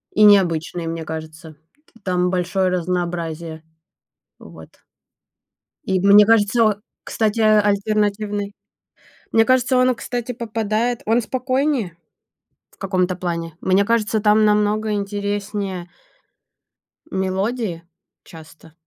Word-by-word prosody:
И 215 - +4
необычный, 175 -4 +3
мне 165 0 -4
кажется. 160 +1 -8 0.3
Т 230 - -23
там 180 -1 0
большое 185 +1 0
разнообразие. 170 -2 -3 0.8
Вот. 80 -1 -13 1.2
И, 190 -1 0
мне 200 +2 +7
кажется 225 +1 +3
о 215 -1 +2 0.3
кстати, 220 0 -1
альтернативный 210 -1 +1 0.8
мне 225 - +5
кажется, 255 0 +2
он, 255 0 +3
кстати, 245 0 -5
попадает 225 0 -2
он 230 +3 +2
спокойнее 255 - -1 0.7
в - - -27
каком-то 185 -2 -1
плане. 170 -3 -4
Мне 190 +2 +2
кажется, 220 0 0
там 210 +1 +4
намного 210 +1 +1
интереснее 205 -2 -3 1.2
мелодии 190 0 -2 0.4
часто. 160 -1 -15
200 Hz, 100 wpm, -20 LUFS, 180-220 Hz, 1.2 s, мне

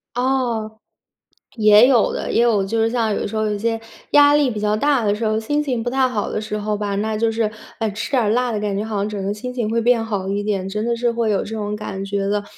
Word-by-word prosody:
哦， 240 -4 -1 0.8
也 215 +2 +7
有 245 -5 +3
的， - - -3
也 230 - +3
有， 220 -5 +3
就 225 +3 -1
是 225 - +2
像 225 -3 0
有 - - -2
时 215 - -7
候 215 0 0
有 210 -1 -1
些， 225 +1 -1 0.3
压 290 0 +6
力 290 -3 +3
比 210 - -4
较 210 0 +1
大 280 -2 +2
的 205 - +2
时 220 +1 -3
候， 215 0 +1
心 290 +7 -1
情 250 -5 -2
不 245 - -1
太 260 0 +2
好 220 -5 -3
的 215 - -2
时 210 0 -4
候 210 0 -2
吧， 205 -1 -2
那 220 +1 -1
就 225 0 +1
是， 220 -1 -1 0.3
呃， 225 - 0
吃 215 - -5
点 255 -4 +2
儿 210 - +1
辣 245 +1 +1
的 210 - -2
感 205 -2 -2
觉 205 - -1
好 220 -1 -4
像 200 +1 -1
整 200 -2 -4
个 200 - -1
心 250 +4 -6
情 235 -4 -2
会 230 +1 0
变 235 -1 +3
好 200 -4 -3
一 205 +1 -1
点， 195 -3 -2
真 210 +3 -3
的 235 0 0
是 240 0 0
会 230 -1 -1
有 200 - 0
这 220 - -6
种 210 -1 -3
感 195 -2 -5
觉 195 0 -2
的。 205 0 0
220 Hz, 300 characters per minute, -20 LUFS, 210-235 Hz, 0.8 s, 也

